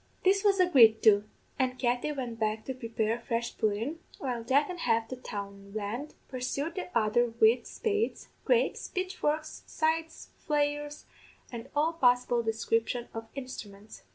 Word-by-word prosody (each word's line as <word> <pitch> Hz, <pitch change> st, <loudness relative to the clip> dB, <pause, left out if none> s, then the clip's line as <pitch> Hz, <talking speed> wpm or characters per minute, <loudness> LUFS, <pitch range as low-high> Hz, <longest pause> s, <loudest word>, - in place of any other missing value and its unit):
"This 390 Hz, +2 st, +4 dB
was 400 Hz, -2 st, +4 dB
agreed 245 Hz, -12 st, +6 dB
to, 205 Hz, -2 st, +6 dB, 0.3 s
and 255 Hz, -1 st, +1 dB
Katty 245 Hz, +3 st, 0 dB
went 245 Hz, -5 st, -5 dB
back 215 Hz, 0 st, -1 dB
to 265 Hz, -, -3 dB
prepare 230 Hz, -3 st, -1 dB
a 235 Hz, -, -4 dB
fresh 235 Hz, 0 st, -2 dB
pudden, 225 Hz, +9 st, -1 dB, 0.2 s
while 245 Hz, -4 st, -3 dB
Jack 275 Hz, +5 st, +3 dB
an' 360 Hz, -1 st, -6 dB
half 230 Hz, -5 st, +1 dB
the 255 Hz, -, -4 dB
townland 205 Hz, +3 st, -6 dB
pursued 275 Hz, +5 st, -3 dB
the 370 Hz, -1 st, -5 dB
other 230 Hz, +2 st, +3 dB
wid 230 Hz, +1 st, +5 dB
spades, 435 Hz, 0 st, -2 dB
graips, -, -, +1 dB
pitchforks, 310 Hz, -5 st, -2 dB
scythes, 320 Hz, +1 st, -1 dB
flails, 295 Hz, -1 st, -1 dB, 0.5 s
and 240 Hz, +1 st, -7 dB
all 310 Hz, +3 st, +2 dB
possible 245 Hz, -5 st, +3 dB
description 225 Hz, +1 st, -1 dB
of 225 Hz, 0 st, -6 dB
instruments. 215 Hz, -6 st, -8 dB
250 Hz, 145 wpm, -30 LUFS, 225-300 Hz, 0.5 s, agreed